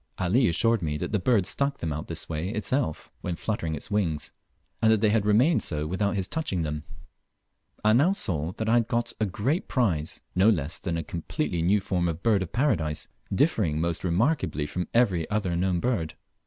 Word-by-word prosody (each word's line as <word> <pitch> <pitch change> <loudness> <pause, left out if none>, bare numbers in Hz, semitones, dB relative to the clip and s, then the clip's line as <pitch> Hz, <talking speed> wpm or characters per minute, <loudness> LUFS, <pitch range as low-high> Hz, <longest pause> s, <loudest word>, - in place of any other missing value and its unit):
Ali 100 +8 +3
assured 115 +5 +2
me 75 -3 -1
that - - -4
the 105 - +1
bird 110 -2 +2
stuck 140 +6 0
them 80 -2 -3
out 75 +3 -5
this 85 -1 -4
way 80 +3 -3
itself, 110 - -1
when 90 - -3
fluttering 85 -6 -2
its 75 - -6
wings, 85 -8 -1 0.5
and 110 - +5
that 110 - +4
they 105 0 +3
had 105 -2 +1
remained 125 +11 +4
so 75 -2 -1
without 95 +6 -1
his 95 -2 -1
touching 120 - -2
them. 75 -1 -3 1.0
I 110 - +6
now 145 +10 +4
saw 85 - -1
that 110 - -4
I 115 - +3
had 120 -1 +3
got 120 0 -1
a 110 - +2
great 125 - -1
prize, 90 - 0
no 95 +4 +5
less 80 -7 0
than 85 -3 -2
a 85 - -2
completely 85 - -3
new 100 +5 +3
form 90 -2 0
of 85 - -1
the 85 - -16
Bird 110 -4 +3
of 95 - -4
Paradise, 80 - 0 0.2
differing 100 - +2
most 85 0 -1
remarkably 95 - +1
from 90 +4 -3
every 95 -9 +2
other 105 -4 0
known 90 0 +1
bird. 95 -8 -1
95 Hz, 205 wpm, -27 LUFS, 85-115 Hz, 1.0 s, I